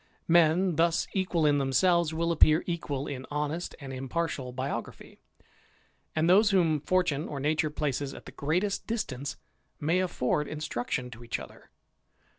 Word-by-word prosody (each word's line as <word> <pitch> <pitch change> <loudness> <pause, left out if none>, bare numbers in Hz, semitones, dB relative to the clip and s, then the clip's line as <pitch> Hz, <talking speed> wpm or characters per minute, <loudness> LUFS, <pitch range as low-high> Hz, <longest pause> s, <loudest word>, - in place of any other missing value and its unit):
Men 170 +1 +4
thus 165 0 +3
equal 185 -4 +1
in 145 -1 +4
themselves 165 +5 +3
will 165 +1 0
appear 155 0 +5
equal 145 -5 -3
in 130 -3 -6
honest 150 +4 -3
and 135 -2 -7
impartial 135 0 -3
biography; 130 +3 -5 1.0
and 155 +1 +2
those 205 +4 +6
w! 170 -6 +3
fortune 160 -1 0
or 140 - -5
nature 155 +2 +1
places 145 -2 -2
at - - -11
the - - -9
greatest 180 +8 -1
distance 145 - -3 0.4
may 165 +5 +1
instruction 150 -6 -2
to 115 +1 -11
each 115 - -3
other. - - -12
155 Hz, 140 wpm, -29 LUFS, 140-170 Hz, 1.0 s, those